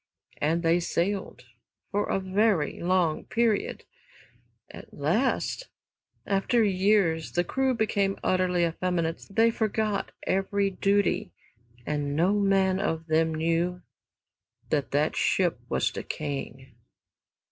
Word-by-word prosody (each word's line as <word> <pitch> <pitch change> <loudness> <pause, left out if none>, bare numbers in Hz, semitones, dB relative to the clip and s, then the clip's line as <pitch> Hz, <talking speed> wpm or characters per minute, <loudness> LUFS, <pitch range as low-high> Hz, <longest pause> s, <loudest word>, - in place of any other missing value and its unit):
And 165 +3 0
they 165 +1 +3
sailed 180 -3 -2 0.5
for 205 +1 0
a - - +1
very 190 -4 +1
long 175 -3 +1
period. 225 -2 0 0.9
At - - -12
last, - - -1 0.6
after 205 +4 +2
years, 190 -4 +2
the 175 - +2
crew 265 +7 0
became 200 -3 0
utterly 180 -2 +2
effeminate, 170 -1 -2
they 225 +3 +3
forgot 215 -2 -1
every 195 +1 0
duty, 200 +1 +1 0.6
and 145 -1 -2
no 175 +6 +3
man 195 -1 +2
of 165 -4 -2
them 160 0 +1
knew 170 +3 0 0.9
that - - 0
that - - +1
ship - - +1
was - - +1
decaying. 135 -3 -6
185 Hz, 110 wpm, -27 LUFS, 165-200 Hz, 0.9 s, they